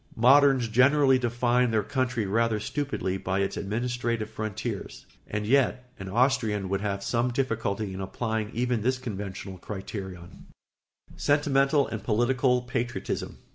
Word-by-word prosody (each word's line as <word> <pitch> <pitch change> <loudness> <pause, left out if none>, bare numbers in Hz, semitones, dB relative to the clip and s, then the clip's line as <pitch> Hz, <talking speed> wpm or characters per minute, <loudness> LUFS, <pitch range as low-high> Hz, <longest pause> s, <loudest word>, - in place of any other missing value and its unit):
Moderns 135 +1 +5
generally 130 +3 +4
define 120 0 +1
their 110 -2 +1
country 130 -1 -1
rather 110 +2 +1
stupidly 130 -7 -2
by 95 0 -2
its 100 - -1
administrative 115 +1 -2
frontiers; 110 -2 -5 0.2
and 105 0 -3
yet 125 0 +1
an 95 0 -6
Austrian 110 -4 +1
would 100 0 -1
have 100 -1 -2
some 120 +3 +1
difficulty 110 -6 -1
in 95 - -5
applying 110 +2 -2
even 120 -1 0
this 130 +4 +1
conventional 100 -5 -6
criterion. 95 -3 -8 0.7
[Sidenote: - - -19
Sentimental 140 -1 +3
and 110 -3 -5
political 125 +2 +2
patriotism. 125 0 -3
115 Hz, 135 wpm, -27 LUFS, 105-130 Hz, 0.7 s, Moderns